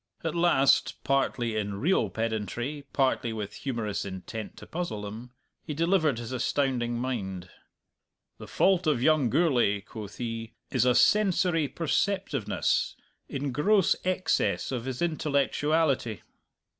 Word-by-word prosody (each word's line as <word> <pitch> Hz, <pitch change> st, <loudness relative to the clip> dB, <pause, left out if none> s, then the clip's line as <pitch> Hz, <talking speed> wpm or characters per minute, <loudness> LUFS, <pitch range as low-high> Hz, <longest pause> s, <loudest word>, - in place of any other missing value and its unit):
At 165 Hz, -2 st, -1 dB
last, 170 Hz, -6 st, +3 dB
partly 130 Hz, -4 st, 0 dB
in 100 Hz, -2 st, -2 dB
real 180 Hz, -, +2 dB
pedantry, 115 Hz, +6 st, -3 dB
partly 130 Hz, -4 st, +1 dB
with 105 Hz, -2 st, -5 dB
humorous 110 Hz, -6 st, -3 dB
intent 100 Hz, +3 st, -7 dB
to -, -, -10 dB
puzzle 165 Hz, -12 st, -4 dB
them, 110 Hz, +4 st, -7 dB, 0.3 s
he 150 Hz, -, -6 dB
delivered 165 Hz, -4 st, +2 dB
his 120 Hz, 0 st, -6 dB
astounding 125 Hz, -2 st, 0 dB
mind. 95 Hz, -8 st, -4 dB, 0.9 s
"The -, -, -9 dB
fault 185 Hz, -3 st, +2 dB
of 135 Hz, -6 st, +2 dB
young 155 Hz, -5 st, +4 dB
Gourlay," 125 Hz, -, +2 dB
quoth 105 Hz, 0 st, -9 dB
he, 115 Hz, -1 st, -5 dB, 0.2 s
"is 125 Hz, -2 st, +2 dB
a 125 Hz, -1 st, +4 dB
sensory 180 Hz, -4 st, +3 dB
perceptiveness 165 Hz, -, 0 dB, 0.3 s
in 140 Hz, 0 st, -3 dB
gross 195 Hz, +8 st, +3 dB
excess 185 Hz, -5 st, 0 dB
of 125 Hz, -2 st, -3 dB
his 130 Hz, +4 st, -3 dB
intellectuality." 150 Hz, -, 0 dB
130 Hz, 125 wpm, -28 LUFS, 115-155 Hz, 0.9 s, young